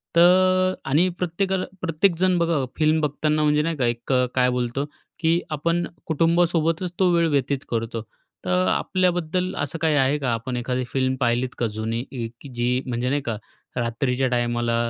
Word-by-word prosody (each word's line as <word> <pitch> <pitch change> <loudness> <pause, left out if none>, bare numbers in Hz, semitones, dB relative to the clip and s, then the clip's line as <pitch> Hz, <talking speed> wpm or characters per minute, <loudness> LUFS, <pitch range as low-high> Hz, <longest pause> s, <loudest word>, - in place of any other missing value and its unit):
तर 185 +1 +5 0.2
आणि 165 +7 +4
प्रत्येकाला 185 +2 -1 0.2
प्रत्येकजण 180 +1 +2
बघा, 165 -5 +1
फिल्म 155 0 +3
बघताना 150 +1 0
म्हणजे 150 0 +3
नाही 165 +1 -1
का, 130 -5 0
एक 120 +2 -2
अ, 125 0 +4
काय 125 -1 +4
बोलतो 125 +2 -1 0.3
की 165 +1 +3
आपण 170 +3 0 0.2
कुटुंबासोबतच 165 +1 +1
तो 185 -2 +4
वेळ 170 -1 +3
व्यतीत 140 -1 +1
करतो. 115 -1 -2 0.4
तर 90 0 +2
आपल्याबद्दल 180 - 0
असं 145 +3 -2
काही 160 -2 +3
आहे 140 +1 +3
का? 130 -4 -1
आपण 125 +2 -3
एखादी 125 +1 -1
फिल्म 130 -1 +1
पाहिलीत 120 +1 +1
का, 120 - 0
जुनी 110 +2 -3
इ 120 -4 -4
की 140 - -10
जी 125 +2 +1
म्हणजे 125 0 -1
नाही 145 +2 +1
का, 115 -5 -3 0.4
रात्रीच्या 125 +2 0
टायमाला 120 -1 0
145 Hz, 165 wpm, -23 LUFS, 125-170 Hz, 0.4 s, तर